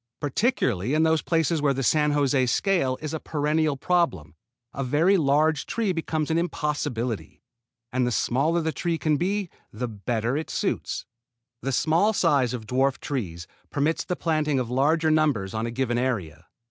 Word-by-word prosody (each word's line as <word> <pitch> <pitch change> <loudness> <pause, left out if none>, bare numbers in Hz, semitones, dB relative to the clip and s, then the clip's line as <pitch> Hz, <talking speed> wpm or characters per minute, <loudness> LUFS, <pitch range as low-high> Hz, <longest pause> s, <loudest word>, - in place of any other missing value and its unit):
Particularly 140 - 0
in 155 - +3
those 160 -1 +3
places 165 -2 +1
where 140 -2 +2
the 135 - -2
San 150 +3 +3
José 135 -3 +2
scale 135 - +1
is 155 - -4
a 160 - -2
perennial 150 -1 0
problem 150 - 0 0.4
a 135 - -3
very 155 +9 +3
large 150 -1 +2
tree 225 -4 0
becomes 160 -2 -2
an 165 - +2
impossibility, 145 - -3 0.5
and 125 -1 +1
the - - 0
smaller 145 +9 +1
the 160 0 -1
trees 170 +1 -2
can 155 -1 +1
be 190 +2 -1 0.2
the 125 +3 -4
better 115 +3 -2
it 155 +2 -3
suits. - - -2 0.6
The 135 - -2
small 165 - +2
size 145 - +2
of 120 -3 -5
dwarf 130 +3 +1
trees 90 - -4 0.2
permits 150 +3 0
the 180 - -2
planting 155 -4 0
of 125 -2 -3
larger 155 +5 +2
numbers 145 -12 +1
on 110 +1 -2
a - - -4
given 120 -1 -1
area. 90 - -3
145 Hz, 170 wpm, -25 LUFS, 125-160 Hz, 0.6 s, in